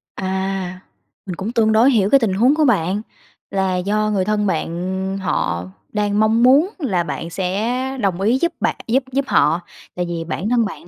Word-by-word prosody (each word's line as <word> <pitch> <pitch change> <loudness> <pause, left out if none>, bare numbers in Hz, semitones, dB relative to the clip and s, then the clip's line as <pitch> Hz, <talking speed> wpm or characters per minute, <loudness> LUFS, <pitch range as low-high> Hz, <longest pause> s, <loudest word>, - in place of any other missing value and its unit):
À, 190 -1 -3 0.5
mình 185 -3 -5
cũng 205 +6 -4
tương 225 -3 +2
đối 235 +5 +5
hiểu 205 -4 +2
cái 275 - +6
tình 215 -6 0
huống 250 +9 +3
của 310 -1 +3
bạn, 195 -3 +1 0.5
là 190 -1 0
do 210 +3 0
người 190 -2 +1
thân 210 0 0
bạn 190 +3 -2
họ 90 - -1 0.3
đang 205 0 0
mong 220 +2 +3
muốn 285 +9 +5
là 190 - 0
bạn 170 0 -5
sẽ 230 +9 -2
đồng 190 -2 0
ý 230 +6 +3
giúp 340 - +1
bạn - - 0
giúp 260 +4 +2
giúp 275 +1 0
họ, 155 +4 +3 0.3
tại 180 0 -1
vì 170 -1 -3
bản 175 +6 -3
thân 235 -2 +3
bạn 195 - -8
200 Hz, 195 wpm, -20 LUFS, 185-230 Hz, 0.5 s, cái